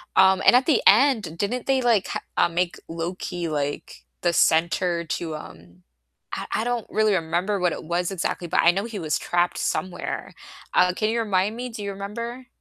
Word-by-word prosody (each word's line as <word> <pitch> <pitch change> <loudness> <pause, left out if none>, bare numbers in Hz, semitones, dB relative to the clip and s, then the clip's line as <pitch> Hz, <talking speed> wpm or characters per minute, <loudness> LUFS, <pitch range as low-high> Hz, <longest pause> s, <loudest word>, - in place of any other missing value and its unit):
um, 190 0 +5
and - - +7
at 255 +1 +4
the 295 -6 +3
end, 215 - +4
didn't 230 +6 -2
they 265 -1 +2
like 230 -5 +2
ha - - -4 0.2
uh, - - +5
make 175 +1 -1
Loki, 170 +1 -4
like, 145 -1 -4 0.2
the 175 - +2
center 170 +1 +2
to, 160 -1 -3
um 85 - -12 0.5
I - - -3 0.2
I - - -1
don't 240 -2 -2
really 215 -1 +2
remember 180 +4 -1
what 180 -1 +1
it - - -7
was 175 +3 -1
exactly, 175 -1 -3
but - - +2
I 170 - +7
know 195 +4 -2
he 230 -3 -6
was 155 -3 -1
trapped 175 0 0
somewhere, 185 -1 -3 0.4
uh, 180 0 +4
can 215 0 0
you 230 - 0
remind 205 -1 0
me? 250 +1 -4
Do 225 -3 -7
you 200 - -3
remember? 235 +6 -6
185 Hz, 195 wpm, -24 LUFS, 170-220 Hz, 0.5 s, and